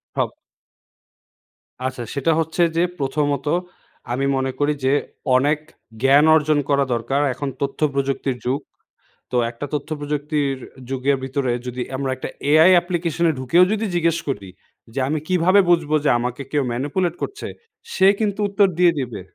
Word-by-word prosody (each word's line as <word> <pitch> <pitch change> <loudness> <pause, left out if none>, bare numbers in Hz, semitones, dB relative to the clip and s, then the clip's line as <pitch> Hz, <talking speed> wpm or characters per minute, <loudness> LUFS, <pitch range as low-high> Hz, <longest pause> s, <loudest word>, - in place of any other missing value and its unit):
হব - - -1 1.5
আচ্ছা, 130 -2 -3
সেটা 145 +4 +1
হচ্ছে 160 +2 -1 0.2
যে 170 - +4 0.2
প্রথমত 140 0 -1 0.7
আমি 135 +3 0
মনে 130 0 -1
করি 145 +1 +2
যে 135 - +3 0.4
অনেক 145 +4 +3 0.4
জ্ঞান 140 +3 +5
অর্জন 155 -1 +2
করা 140 -1 +3
দরকার। 135 +4 0
এখন 145 - -5
তথ্যপ্রযুক্তির 140 -2 -1
যুগ। 130 +3 0 0.7
তো 125 - +1
একটা 120 +4 -6
তথ্যপ্রযুক্তির 145 -1 -2 0.3
যুগের 135 +1 +1
ভিতরে 130 -1 -1 0.2
যদি 125 0 -4 0.2
আমরা 135 -1 -2
একটা 130 - -6 0.2
এআই 160 +4 +7
অ্যাপ্লিকেশনে 170 -1 +1
ঢুকেও 135 +8 +4
যদি 220 +1 0
জিজ্ঞেস 165 -1 +2
করি 100 -9 -4 0.4
যে, 135 - -2
"আমি 155 +2 0
কীভাবে 185 +2 +4
বুঝবো 165 -3 +3
যে - - +4
আমাকে 125 +3 -3
কেউ 145 -2 +1
ম্যানিপুলেট 150 +8 -1
করছে?" 410 - -5 0.5
সে 190 - +4
কিন্তু 210 -2 -1
উত্তর 200 0 +4
দিয়ে 175 -1 +6
দিবে। 120 -6 -4
145 Hz, 145 wpm, -21 LUFS, 135-165 Hz, 1.5 s, এআই